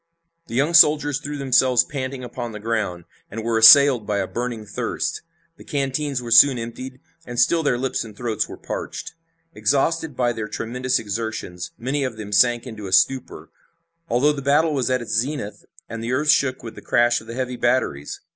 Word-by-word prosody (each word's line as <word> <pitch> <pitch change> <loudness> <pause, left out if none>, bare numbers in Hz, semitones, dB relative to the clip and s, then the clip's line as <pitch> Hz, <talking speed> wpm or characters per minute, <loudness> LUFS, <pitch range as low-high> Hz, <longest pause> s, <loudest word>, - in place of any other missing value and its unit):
The - - -7
young 145 +6 +1
soldiers 150 -3 +5
threw 145 0 -6
themselves 130 -2 +3
panting 130 -2 -6
upon 120 -1 -6
the 105 - -7
ground, 105 -6 -3 0.3
and 110 +2 -6
were 115 0 0
assailed 135 -2 +7
by 105 -1 -1
a 100 - -1
burning 120 0 -5
thirst. 100 - -4 0.4
The - - -14
canteens 140 -1 -2
were 120 - -7
soon 130 +3 +7
emptied, 130 +3 -7 0.2
and 120 -5 -6
still 165 +7 +3
their 140 -5 0
lips 130 +1 -2
and 110 -3 -13
throats 110 -3 -2
were - - -9
parched. - - -6 0.4
Exhausted 160 0 0
by 120 -1 +1
their 110 -1 -5
tremendous 125 +4 -2
exertions, 105 -5 -5
many 135 +4 -2
of 125 -4 -4
them 105 -1 -8
sank 120 +4 +3
into 110 -5 -8
a - - -8
stupor, 130 +8 0 0.6
although 140 +5 +2
the 140 - -6
battle 150 +3 +2
was 130 -4 -1
at 130 -1 0
its - - -6
zenith 120 -1 -3 0.2
and 115 0 -7
the 120 +2 -2
earth 150 +3 +3
shook 130 -3 0
with 115 - -8
the - - -12
crash 120 0 +2
of 110 - -16
the 115 - -7
heavy 125 -1 -3
batteries. 120 - -1
125 Hz, 195 wpm, -22 LUFS, 115-135 Hz, 0.6 s, assailed